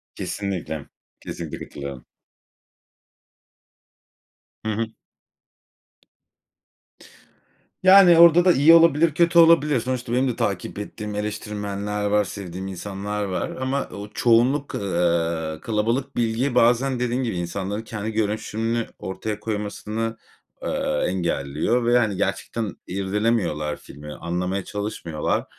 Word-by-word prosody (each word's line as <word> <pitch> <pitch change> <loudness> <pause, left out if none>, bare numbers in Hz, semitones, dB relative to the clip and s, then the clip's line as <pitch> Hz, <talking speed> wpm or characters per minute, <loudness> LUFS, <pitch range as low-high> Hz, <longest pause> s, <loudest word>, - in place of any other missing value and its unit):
Kesinlikle, 90 -7 -4 0.3
kesinlikle - - -6
katılıyorum. 70 -3 -8 2.6
Hı 110 - 0
hı. 115 +2 -1 3.0
Yani, 185 -2 +8
orada 170 +1 +7
da 185 - +7
iyi 155 +1 +6
olabilir, 165 -1 +5
kötü 170 +2 +4
olabilir. 155 -5 +5
Sonuçta 125 0 -3
benim 130 +2 +2
de 125 - -1
takip 100 -1 -2
ettiğim 105 0 -6
eleştirmenler 105 -1 -3
var, 105 0 +3
sevdiğim 95 -1 -7
insanlar 100 +2 -4
var 95 -2 -2
ama 130 +2 -2
o 100 +1 -8
çoğunluk, 125 +5 +2
eee, 85 -4 0
kalabalık 115 - -1
bilgiyi 120 +3 0
bazen 125 +2 +3
dediğin 125 +1 0
gibi 115 -6 -2
insanların 95 +4 -3
kendi 110 -1 -5
görüşünü 110 +2 -1
ortaya 105 +3 -4
koymasını, 110 +1 -3 0.5
eee, 75 - -1
engelliyor 85 - -1
ve 120 +1 +4
,hani, 110 -5 +1
gerçekten 110 0 -2
irdelemiyorlar 95 -6 -1
filmi, 75 +1 -11
anlamaya 90 +4 -3
çalışmıyorlar, 100 -7 -3
105 Hz, 105 wpm, -23 LUFS, 95-125 Hz, 3.0 s, Yani